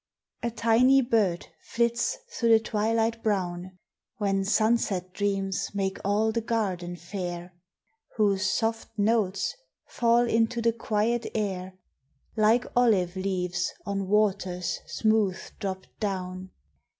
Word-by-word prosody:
A 235 - -1
TINY 235 +4 +4
bird 215 -8 +1
flits 235 - 0
through 235 - 0
the 225 -1 +7
twilight 225 +1 0
brown, 185 -3 -2 0.4
When 195 -2 0
sunset 200 -3 +1
dreams 195 -1 -1
make 195 -1 -1
all 210 +3 +2
the 230 +1 -1
garden 190 -6 -2
fair, 175 -1 -6 0.6
Whose 200 -3 +2
soft 225 +2 -1
notes 205 -2 +1 0.3
fall 235 0 +2
into 230 +1 +1
the 230 0 +2
quiet 225 +1 0
air 190 -3 -3 0.6
Like 225 +3 +3
olive 200 -8 +3
leaves 185 -1 -1
on 195 -1 -2
waters 190 -3 0
smooth 205 +2 +1 0.2
dropped 190 -1 -4
down. 185 -2 -3
205 Hz, 115 wpm, -27 LUFS, 185-225 Hz, 0.6 s, the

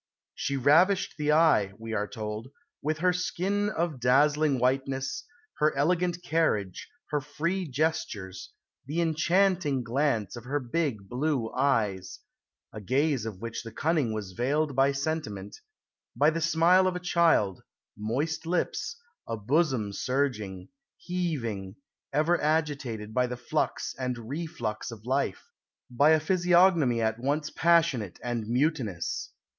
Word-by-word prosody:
"She 140 - -2
ravished 165 +9 +4
the 150 0 +2
eye," 150 -12 +4
we 115 0 -6
are 105 -1 -1
told, 110 0 -5 0.3
"with 155 +1 -1
her 180 +3 +2
skin 195 +3 -1
of 170 -8 -2
dazzling 145 +3 +3
whiteness, 135 +1 -1 0.3
her 150 -2 +2
elegant 175 +4 +1
carriage, 110 - 0 0.2
her 150 -1 +1
free 170 +6 -2
gestures, 130 - -2 0.4
the 155 +4 -2
enchanting 170 -3 +2
glance 125 -3 0
of 120 - -9
her 145 +3 -1
big 125 -6 -2
blue 130 -1 -1
eyes 105 -9 0 0.6
a 105 - -7
gaze 130 +2 +1
of 100 -4 -7
which 115 0 -4
the 115 - -9
cunning 150 -1 0
was 105 -3 -4
veiled 140 +7 0
by 135 +1 +4
sentiment 135 -9 -4 0.6
by 150 +2 +4
the 165 +1 -3
smile 170 +3 +4
of 185 - -1
a - - -2
child, 170 - +2 0.3
moist 140 +10 -2
lips, 180 - -1 0.3
a 115 - -3
bosom 125 -2 +1
surging, 115 -8 -2 0.3
heaving, 120 - -3 0.4
ever 155 +5 +2
agitated 140 -9 -1
by 125 +1 +2
the 125 0 -5
flux 120 - -2
and 125 -1 -2
reflux 120 -3 -4
of 115 -2 -10
life, 140 - -1 0.4
by 140 +5 +4
a 160 0 +6
physiognomy 175 -6 +3
at 110 +1 0
once 145 +4 -1
passionate 160 - +2
and 120 -3 -3
mutinous." 120 - -1
140 Hz, 135 wpm, -28 LUFS, 115-160 Hz, 0.6 s, a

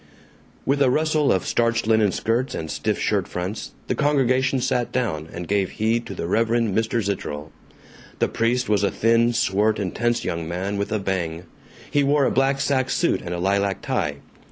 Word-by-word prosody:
With 140 +1 +1
a 135 - +5
rustle 155 +1 +2
of 95 - +1
starched 115 -1 +1
linen 110 -2 +3
skirts 115 +7 -1
and 80 -1 -4
stiff - - -1
shirt - - 0
fronts, 90 +4 -5
the - - -1
congregation 130 -2 +2
sat 120 -1 0
down, 90 -12 -2
and 85 0 -6
gave 100 -2 +1
heed 115 +2 0
to 100 - -6
the 85 - -4
Reverend 115 +2 +1
Mr. 110 0 0
Zitterel. 80 -6 -4 0.7
The - - +2
priest 125 +2 0
was 105 -2 +2
a 100 - +3
thin, 115 +2 +3
swart, 110 -3 +1
intense 115 +5 -1
young 85 -1 -3
man 95 +4 -2
with 100 +1 -2
a 110 - +1
bang. 90 -4 -2 0.5
He 145 - +3
wore 140 0 +3
a - - +2
black 135 +1 +2
sack 135 -2 +1
suit - - +1
and 85 - -6
a - - -4
lilac 100 +1 0
tie. 70 -2 -1
110 Hz, 185 wpm, -23 LUFS, 95-125 Hz, 0.7 s, a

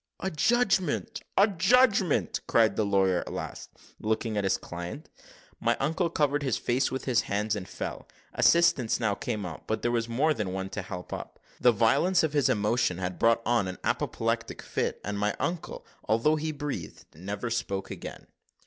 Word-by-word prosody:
"A 190 - -2
judgment! 195 -1 +1 0.2
a 200 - +7
judgment!" 200 - +3
cried 110 -3 +4
the 110 - +1
lawyer 95 -3 +2
at - - -6
last, - - -6 0.3
looking 110 +1 -1
at 105 - 0
his 95 0 +2
client. 90 - -7 0.5
My 120 +1 +1
uncle 165 +5 0
covered 145 -3 +1
his 130 -5 0
face 125 +2 +1
with 130 - -4
his 120 -2 +3
hands, 105 +1 0
and 100 -3 -6
fell. - - -6 0.3
Assistance 170 -9 +4
now 110 -3 +1
came 105 0 -3
out, 85 -3 -8
but 110 - -2
there 120 - +1
was 115 -1 -1
more 145 +7 +2
than 105 -8 -3
one 95 0 -4
to 105 - -3
help 90 -1 -7
up. - - -7 0.2
The 125 - +6
violence 140 - +3
of 155 -2 0
his 145 -4 +3
emotion 105 -2 +1
had 90 -1 -4
brought 115 0 +3
on 120 -5 +2
an 90 - -5
apoplectic - - -1
fit, - - -2
and 100 +1 -3
my 105 0 0
uncle, 170 -1 -3 0.2
although 115 +8 +3
he 155 +1 -2
breathed, 145 - -6
never 100 +7 -5
spoke 100 -5 -2
again. - - -8
115 Hz, 180 wpm, -28 LUFS, 100-150 Hz, 0.5 s, a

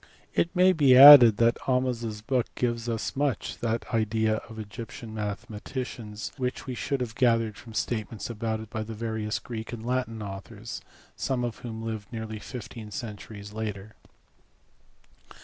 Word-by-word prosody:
It 170 - 0
may 185 +1 +6
be 140 -6 +6
added 130 -6 +11
that 115 0 +3
Ahmes 125 -2 +1
s 105 -2 -5
book 125 +2 0
gives 120 -1 -1
us 115 -1 -3
much 140 -2 -1
that 115 0 -1
idea 110 0 +1
of 110 - -10
Egyptian 110 +1 -8
mathematics 105 +1 -5
which 125 -1 -3
we 130 - -4
should 135 +2 -2
have 120 -3 -3
gathered 115 -3 +2
from 115 +2 -12
statements 110 0 -3
about 110 -1 -3
it 110 0 -11
by 110 - -3
various 110 -1 -3
Greek 115 -2 -7
and 115 -2 -7
Latin 120 -3 -2
authors, 100 +3 -7 0.3
some 130 -2 -1
of 120 -2 -3
whom 110 -2 -6
lived 110 -3 -5
nearly 110 -2 -5
fifteen 115 -2 -8
centuries 105 -1 -8
later. 105 -1 -5
115 Hz, 150 wpm, -27 LUFS, 110-125 Hz, 0.3 s, added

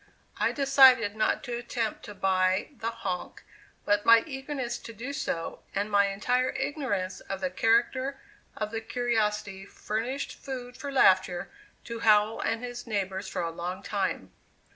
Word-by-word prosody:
I - - +2
decided 265 -6 +6
not 220 - +1
to 245 -3 -4
attempt 235 -2 -3
to 210 - -9
buy 185 -1 +1
the 225 - -1
"honk," 200 -6 -5 0.4
but 205 0 +2
my 230 0 +7
eagerness 270 -4 -4
to 230 - -10
do 250 +6 -6
so 165 -10 -3
and 205 +2 -1
my 200 0 +4
entire 245 +6 +1
ignorance 200 -11 -2
of 195 - -6
the 185 -1 -2
character 250 +6 +1 0.4
of 215 0 -3
the 225 0 -3
curiosity 215 -5 -1
furnished 230 +7 -4
food 250 -2 -7
for 280 +2 -6
laughter 185 -8 +3 0.3
to 235 -1 -6
Howell 215 0 +4
and 225 +1 -1
his 245 0 -6
neighbors 195 -2 -2
for 185 -2 -3
a 165 - -2
long 175 +2 -5
time. 190 - -2
220 Hz, 155 wpm, -28 LUFS, 195-245 Hz, 0.4 s, my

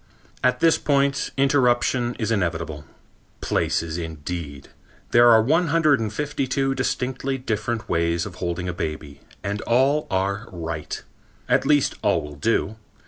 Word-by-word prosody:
At 125 0 +2
this 165 -1 +4
point, 140 -1 +1
interruption 125 -3 +2
is 110 -1 -2
inevitable. 85 -6 -2 0.5
Places 85 0 -1
indeed! 80 -3 -6 0.4
There 120 0 +7
are 110 -1 +6
one 165 +8 +2
hundred 155 -3 +3
and 110 -2 -2
fifty 145 0 -2
two 135 +1 0
distinctly 130 +1 -2
different 115 -2 -3
ways 85 0 0
of 100 - -7
holding 85 +1 -2
a 90 - -2
baby 75 -4 -5 0.2
and 100 +1 -3
all 135 +5 +2
are 100 +4 -1
right! 80 -3 -5 0.4
At - - +2
least 145 -2 +3
all - - +2
will 75 -1 -9
do. 110 +5 0
110 Hz, 140 wpm, -23 LUFS, 85-135 Hz, 0.5 s, There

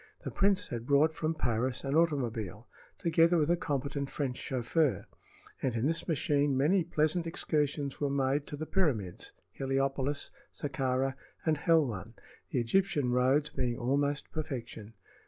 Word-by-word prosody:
The - - -4
prince 200 0 +2
had 120 0 -5
brought 145 +3 +4
from 155 +1 -1
Paris 125 -1 -1
an 135 0 -2
automobile, 120 - 0 0.3
together 170 +1 +4
with 155 +1 +2
a - - +5
competent 140 -3 -2
French 135 -4 -2
chauffeur, 130 +3 0 0.6
and 130 -3 0
in 115 +2 0
this 165 +3 -1
machine 145 -3 +1
many 170 +7 +3
pleasant 165 +1 0
excursions 150 -4 -1
were 145 - +1
made 140 +1 0
to 145 - -6
the 155 - -4
pyramids, 130 - -1 0.2
Heliopolis, 135 +1 -1 0.2
Sakkara 135 -2 -1 0.3
and 160 -2 +2
Helwan, 120 - +1 0.3
the 130 - 0
Egyptian 145 +1 +1
roads 130 +4 +3
being 125 -3 -1
almost 140 +3 0
perfection. 120 -7 -5
140 Hz, 140 wpm, -31 LUFS, 125-155 Hz, 0.6 s, a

